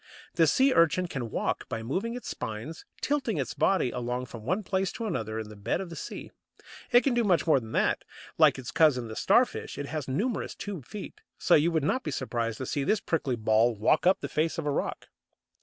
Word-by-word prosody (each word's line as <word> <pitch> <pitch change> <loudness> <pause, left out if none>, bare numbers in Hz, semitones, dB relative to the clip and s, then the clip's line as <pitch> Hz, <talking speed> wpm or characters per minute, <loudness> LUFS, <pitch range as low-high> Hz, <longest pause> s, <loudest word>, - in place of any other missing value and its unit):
The - - +4
Sea 265 0 +4
urchin 165 +2 +3
can 130 -9 -4
walk - - -2
by 110 - -4
moving 195 - -2
its 245 - -7
spines, 125 +7 -6 0.2
tilting 265 - 0
its 135 -4 -2
body 185 -10 +2
along 125 +1 -3
from 115 -3 -10
one 185 - -1
place 190 0 0
to 230 - -5
another 110 - -2
on 110 - -5
the 105 - -11
bed 100 +10 -2
of 190 -3 -6
the - - -6
sea. - - -7 0.6
It 245 0 +7
can 270 - +2
do 240 0 +2
much 185 -5 +2
more 155 -5 +4
than 110 -2 -10
that. - - +1 0.3
Like - - +5
its 130 -2 -6
cousin 130 -8 +3
the 110 - -6
Starfish, 235 - +2
it 145 - -3
has 150 -1 -4
numerous 205 - -2
tube 190 -11 -6
feet, 210 - -8 0.2
so 175 - +2
you 155 +2 +5
would 160 -3 +1
not 255 - +1
be - - -4
surprised 115 -5 -2
to 130 - -4
see 140 +2 -1
this 215 +9 +2
prickly 145 -9 -1
ball 110 +1 +3
walk 115 - +2
up 190 +1 +4
the - - -3
face 160 +3 -1
of 165 - -3
a 145 - +1
rock. - - -3
155 Hz, 225 wpm, -28 LUFS, 120-195 Hz, 0.6 s, It